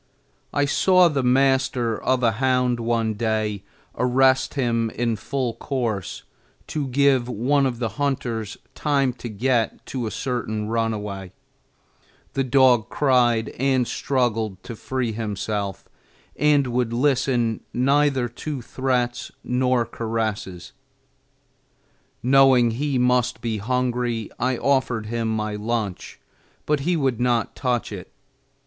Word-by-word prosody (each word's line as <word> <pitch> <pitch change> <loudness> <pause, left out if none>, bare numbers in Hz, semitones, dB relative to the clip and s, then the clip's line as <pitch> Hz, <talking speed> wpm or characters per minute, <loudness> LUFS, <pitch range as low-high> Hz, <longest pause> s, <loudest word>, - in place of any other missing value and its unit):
I 145 - +1
saw 185 +4 +4
the 140 -3 0
master 130 -2 +2
of 130 -1 +1
a 115 - +4
hound 125 +1 +1
one 115 -1 0
day 110 -2 -1 0.3
arrest 130 +1 +2
him 115 -4 0
in 115 0 -1
full 130 +1 -3
course 115 -9 -3 0.5
to 150 -3 -2
give 130 -1 +2
one 135 +5 +2
of 120 -2 -3
the 115 -1 -1
hunters 115 -6 -2 0.2
time 140 -4 +1
to 120 -1 -8
get 115 +2 0
to 125 -4 -4
a - - -2
certain 110 -4 -3
runaway; 105 -4 -3 1.0
the 135 - 0
dog 125 -3 +4
cried 120 -5 +2
and 130 -2 +2
struggled 115 -7 -1
to 115 - -7
free 125 +1 -2
himself 105 -2 -4 0.5
and 150 -1 +3
would 120 -1 -1
listen 125 -3 +1
neither 135 0 +2
to 130 +2 -6
threats 125 -1 -1
nor 125 -1 +1
caresses. 110 -5 -4 1.5
Knowing 130 -2 +5
he 140 +3 -1
must 125 -1 +2
be 115 -2 -2
hungry, 120 -1 -1
I 125 +1 0
offered 130 -5 +1
him 115 +1 -2
my 110 -1 -2
lunch, 105 -2 -3 0.5
but 150 -1 +1
he 170 +5 0
would 135 -6 0
not 120 -2 +1
touch 125 -5 -1
it. 95 -4 -8
125 Hz, 125 wpm, -23 LUFS, 115-130 Hz, 1.5 s, Knowing